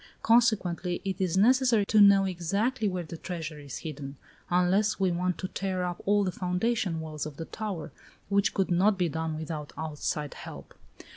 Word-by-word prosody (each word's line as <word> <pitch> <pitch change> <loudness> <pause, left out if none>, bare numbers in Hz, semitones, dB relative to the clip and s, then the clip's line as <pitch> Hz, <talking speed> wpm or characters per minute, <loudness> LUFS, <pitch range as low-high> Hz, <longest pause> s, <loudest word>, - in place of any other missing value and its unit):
Consequently, 190 -7 +2
it 190 0 -2
is 185 -1 +1
necessary 240 0 +4
to 215 +1 +4
know 200 -1 +7
exactly 200 +7 -1
where 185 -2 -2
the 165 0 -8
treasure 160 -3 -6
is 140 -3 -7
hidden, 140 -3 -6 0.3
unless 185 +5 +2
we 190 -2 +2
want 180 +1 -1
to 185 - -4
tear 185 -1 -2
up 175 -1 -3
all 205 0 +4
the 185 - -1
foundation 180 0 -1
walls 155 -2 -5
of 150 -1 -10
the 165 - -5
tower, 190 -6 -5 0.4
which 200 0 +1
could 190 -2 0
not 195 +4 +3
be 180 -2 +1
done 160 0 -3
without 155 -1 -5
outside 150 -1 -3
help." - - -10
180 Hz, 175 wpm, -28 LUFS, 160-200 Hz, 0.4 s, know